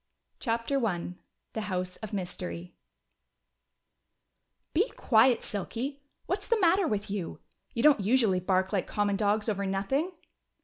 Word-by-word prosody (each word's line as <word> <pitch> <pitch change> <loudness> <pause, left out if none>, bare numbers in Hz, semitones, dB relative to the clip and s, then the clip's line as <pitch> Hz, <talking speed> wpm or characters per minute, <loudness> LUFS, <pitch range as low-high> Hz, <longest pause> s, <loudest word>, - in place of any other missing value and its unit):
CHAPTER 235 +3 0
I 180 -5 -1 0.4
The 220 - -2
House 185 -3 -3
of 215 - -7
Mystery 180 -2 -5 2.0
"Be 400 +10 +3
quiet, 230 +1 +4
Silky! 250 +7 -4 0.2
What's 390 +3 -2
the 465 -2 +3
matter 370 0 +4
with 210 -1 -2
you? 195 -5 -4 0.4
You 230 - 0
don't 300 -5 +7
usually 210 -2 +3
bark 185 +1 +1
like 195 - 0
common 205 -1 +1
dogs 210 +1 +1
over 200 -2 0
nothing!" 270 - 0
215 Hz, 130 wpm, -29 LUFS, 190-265 Hz, 2.0 s, don't